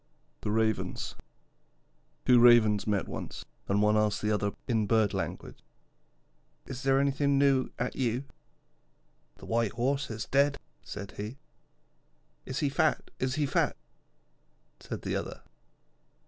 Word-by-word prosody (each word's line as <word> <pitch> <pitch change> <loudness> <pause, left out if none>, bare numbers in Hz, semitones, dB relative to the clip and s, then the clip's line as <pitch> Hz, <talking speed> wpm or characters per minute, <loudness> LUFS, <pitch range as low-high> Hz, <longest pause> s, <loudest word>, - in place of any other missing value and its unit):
THE - - -3
RAVENS 110 0 0 1.1
Two 125 -1 +6
Ravens 115 -4 +6
met 105 -2 0
once, - - -6 0.2
and 100 +1 +2
one 105 0 +4
asked 105 -1 +2
the 105 - +1
other 105 -1 0
in 110 -4 +1
Bird 110 -2 +3
language: - - -4 1.1
'Is 130 0 -7
there 135 0 +3
nothing 140 0 +2
new 135 -2 +3
at 125 - -2
you?' 125 0 0 1.1
'The - - -12
white 115 -2 0
Horse 135 +4 0
is 110 -1 -4
dead,' 140 +1 +2 0.2
said 100 -1 -7
he. 105 +6 -5 1.1
'Is 130 +3 -3
he 145 - +2
fat? 150 +3 +1
Is 130 +1 0
he 150 -2 +1
fat?' 135 - +1 1.0
said - - -7
the - - -2
other. - - -5
120 Hz, 135 wpm, -29 LUFS, 105-135 Hz, 1.1 s, Two